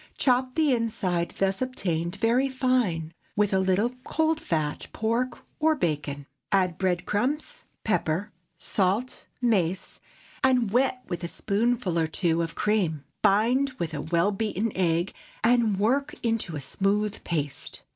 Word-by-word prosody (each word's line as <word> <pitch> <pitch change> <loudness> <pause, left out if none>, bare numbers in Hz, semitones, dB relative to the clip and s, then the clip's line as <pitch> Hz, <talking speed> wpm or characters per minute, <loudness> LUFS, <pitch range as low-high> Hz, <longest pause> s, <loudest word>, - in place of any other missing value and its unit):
Chop 255 -1 +2
the 310 -4 +3
inside 200 -7 0
thus 195 +2 +1
obtained 175 -9 -1
very 235 +6 +2
fine, 245 -12 0 0.2
with 205 -1 +2
a 190 - +4
little 190 +5 +2
cold 320 0 +1
fat 155 - -2
pork 235 +3 0 0.2
or 315 +1 +4
bacon. 145 - -2 0.3
Add 185 -4 +2
bread 180 -2 0
crumbs, 290 - -2 0.2
pepper, 205 -1 0 0.3
salt, 205 +6 -1 0.2
mace, 190 -6 +1 0.4
and 250 -5 +3
wet 255 +1 +2
with 175 0 -4
a - - -1
spoonful 205 -2 0
or 160 - +2
two 165 0 +1
of 165 0 -3
cream. 185 -9 +1 0.2
Bind 245 +7 +3
with 165 -2 -3
a 145 - -3
well 170 +5 +2
beaten 215 +1 -1
egg, 175 -1 +1 0.3
and 230 -3 +3
work 270 +8 +1
into 225 -8 -1
a 145 - -4
smooth 200 +8 0
paste. 145 -5 -3
205 Hz, 140 wpm, -27 LUFS, 170-245 Hz, 0.4 s, a